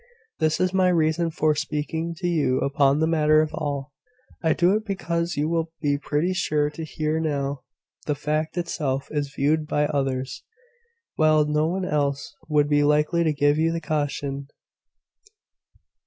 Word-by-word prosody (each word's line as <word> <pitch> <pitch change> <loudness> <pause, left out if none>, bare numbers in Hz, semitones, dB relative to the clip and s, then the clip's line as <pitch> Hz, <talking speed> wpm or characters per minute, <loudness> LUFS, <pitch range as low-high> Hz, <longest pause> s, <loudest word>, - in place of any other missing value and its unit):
This 155 0 +1
is 185 0 +1
my 190 -1 +3
reason 165 0 +2
for 155 -1 +1
speaking 160 +3 -3
to 175 +1 -2
you 150 -7 +1
upon 140 0 +2
the 160 - +2
matter 155 -1 +4
at 155 - -5
all. 145 -2 -3 0.5
I 160 -2 +3
do 175 +3 +3
it 215 +1 0
because 170 -5 -2
you 150 +1 +1
will 165 0 -1
be 145 -2 +1
pretty 155 +5 0
sure 150 -5 0
to 160 +2 -7
hear 155 0 -2
how 140 -3 -2 0.5
the 150 - +1
fact 155 +3 -2
itself 150 -6 -2
is 145 -2 -2
viewed 150 +2 0
by 150 -1 +1
others, 135 -2 -2 0.8
while 155 -1 +4
no 150 +1 +1
one 185 +2 -2
else 145 -2 -1
would 150 -1 +3
be 145 0 +3
likely 150 +3 +2
to 160 - +2
give 145 +1 +2
you 165 +1 +2
the 165 - -2
caution. 145 -2 -3
155 Hz, 165 wpm, -24 LUFS, 145-165 Hz, 0.8 s, matter